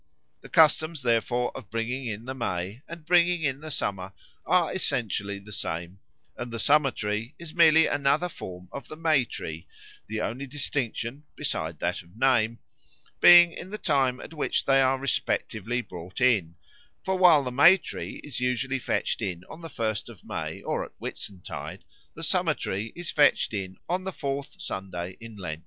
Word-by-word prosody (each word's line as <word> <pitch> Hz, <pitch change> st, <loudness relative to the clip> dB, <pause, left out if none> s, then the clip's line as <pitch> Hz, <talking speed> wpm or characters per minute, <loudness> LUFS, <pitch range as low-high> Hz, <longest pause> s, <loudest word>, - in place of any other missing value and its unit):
The -, -, -13 dB
customs, 155 Hz, -1 st, +4 dB
therefore, 120 Hz, +1 st, +1 dB
of 110 Hz, -7 st, -9 dB
bringing 120 Hz, +4 st, -2 dB
in 110 Hz, +1 st, -5 dB
the 130 Hz, -, -4 dB
May 100 Hz, -2 st, -3 dB
and 165 Hz, -2 st, -9 dB
bringing 175 Hz, 0 st, +4 dB
in 135 Hz, -2 st, 0 dB
the 155 Hz, -, -7 dB
Summer 95 Hz, -8 st, -2 dB, 0.3 s
are 175 Hz, -4 st, +3 dB
essentially 105 Hz, -, -1 dB
the 100 Hz, +2 st, -13 dB
same; 85 Hz, 0 st, -4 dB, 0.4 s
and 120 Hz, 0 st, -6 dB
the 115 Hz, -, -4 dB
Summer 145 Hz, +4 st, +4 dB
tree 110 Hz, +2 st, -3 dB
is 170 Hz, -2 st, -9 dB
merely 160 Hz, -1 st, +6 dB
another 145 Hz, +4 st, +2 dB
form 90 Hz, -, -9 dB
of 140 Hz, -, -7 dB
the -, -, -8 dB
May 155 Hz, -5 st, +2 dB
tree, 80 Hz, -6 st, -7 dB, 0.4 s
the 110 Hz, +1 st, -3 dB
only 130 Hz, +6 st, -3 dB
distinction 135 Hz, -1 st, -3 dB
(besides -, -, -2 dB
that -, -, -1 dB
of 90 Hz, +5 st, -20 dB
name) 115 Hz, -3 st, +3 dB, 0.6 s
being 175 Hz, -1 st, +9 dB
in 180 Hz, -, -8 dB
the 215 Hz, -, -5 dB
time 135 Hz, -8 st, +1 dB
at -, -, -10 dB
which 150 Hz, -, 0 dB
they 135 Hz, 0 st, +5 dB
are 135 Hz, 0 st, +3 dB
respectively 120 Hz, -3 st, -1 dB
brought 90 Hz, +2 st, -9 dB
in; 105 Hz, -11 st, +3 dB, 0.5 s
for 190 Hz, -, 0 dB
while 175 Hz, -6 st, +6 dB
the 125 Hz, -, -3 dB
May 170 Hz, +9 st, +7 dB
tree 170 Hz, -, -7 dB
is 145 Hz, -4 st, -4 dB
usually 125 Hz, +2 st, 0 dB
fetched 120 Hz, -, -1 dB
in 90 Hz, -5 st, -3 dB
on 160 Hz, -, -10 dB
the 165 Hz, -, -7 dB
first 110 Hz, -5 st, -2 dB
of 115 Hz, -6 st, -13 dB
May -, -, -5 dB
or -, -, -1 dB
at -, -, -12 dB
Whitsuntide, 95 Hz, -3 st, -6 dB, 0.3 s
the -, -, -7 dB
Summer -, -, +2 dB
tree 105 Hz, +4 st, -3 dB
is 175 Hz, -2 st, -3 dB
fetched 145 Hz, -5 st, +3 dB
in 95 Hz, -2 st, -4 dB
on 185 Hz, +2 st, -1 dB
the 190 Hz, -, -2 dB
fourth 140 Hz, -4 st, -4 dB
Sunday 95 Hz, -1 st, -5 dB
in 115 Hz, -1 st, -10 dB
Lent. 80 Hz, -6 st, -5 dB
125 Hz, 180 wpm, -27 LUFS, 105-155 Hz, 0.6 s, being